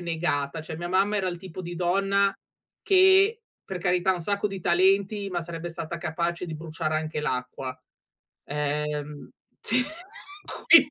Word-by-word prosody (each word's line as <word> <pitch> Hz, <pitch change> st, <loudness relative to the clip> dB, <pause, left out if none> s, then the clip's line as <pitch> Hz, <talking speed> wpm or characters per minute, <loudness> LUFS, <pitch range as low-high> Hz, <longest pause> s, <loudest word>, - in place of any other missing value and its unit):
negata, 160 Hz, -3 st, -1 dB
cioè, 160 Hz, 0 st, -7 dB
mia 175 Hz, +2 st, -4 dB
mamma 195 Hz, +3 st, +2 dB
era 190 Hz, -2 st, 0 dB
il 175 Hz, -, -3 dB
tipo 185 Hz, 0 st, -8 dB
di 175 Hz, 0 st, -6 dB
donna 195 Hz, +3 st, +2 dB, 0.5 s
che 390 Hz, +4 st, +5 dB, 0.2 s
per 190 Hz, -2 st, -5 dB
carità 180 Hz, +1 st, +2 dB
un 180 Hz, -, -4 dB
sacco 200 Hz, +3 st, 0 dB
di 195 Hz, -1 st, -5 dB
talenti, 195 Hz, +4 st, +2 dB
ma 175 Hz, -2 st, -2 dB
sarebbe 170 Hz, 0 st, -6 dB
stata 170 Hz, 0 st, -5 dB
capace 170 Hz, +2 st, -2 dB
di 160 Hz, -, -5 dB
bruciare 155 Hz, 0 st, -3 dB
anche 155 Hz, -1 st, -2 dB
l'acqua, 130 Hz, -2 st, -3 dB, 0.7 s
ehm 150 Hz, 0 st, -3 dB, 0.3 s
sì, 250 Hz, +4 st, +2 dB, 0.9 s
qui -, -, +8 dB
175 Hz, 150 wpm, -26 LUFS, 155-195 Hz, 0.9 s, qui